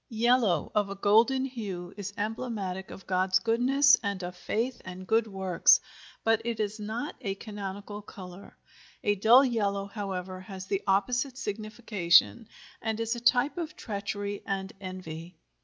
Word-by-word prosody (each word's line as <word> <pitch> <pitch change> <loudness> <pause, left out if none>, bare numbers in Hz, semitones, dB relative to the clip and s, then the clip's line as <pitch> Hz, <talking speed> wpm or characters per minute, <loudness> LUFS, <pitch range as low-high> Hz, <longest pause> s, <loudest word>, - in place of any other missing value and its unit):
YELLOW 235 -3 +2
of 205 -2 +1
a 200 - -5
golden 225 +7 +4
hue 200 -8 -6
is 200 -1 -5
emblematic 205 -4 -3
of 190 - -10
God's 185 0 +2
goodness 255 +6 +4
and 200 -3 -3
of 180 0 -5
faith 235 +7 -2
and 185 0 -8
good 225 +2 +2
works, 190 -3 +4 0.4
but 225 0 +3
it 230 -1 -3
is 215 0 -2
not 220 +7 -4
a 195 -5 -2
canonical 205 0 -7
color. 190 -1 -11 0.5
A 205 - +3
dull 230 +7 +6
yellow, 200 -5 0
however, 190 -3 -5
has 190 0 -8
the 195 0 -1
opposite 245 +7 +1
signification, 215 -2 +2 0.3
and 220 0 -2
is 230 +1 -1
a - - -5
type 245 +7 +2
of 310 -2 -5
treachery 205 -1 -4
and 195 -1 -3
envy. 180 -2 -7
205 Hz, 150 wpm, -29 LUFS, 190-230 Hz, 0.5 s, dull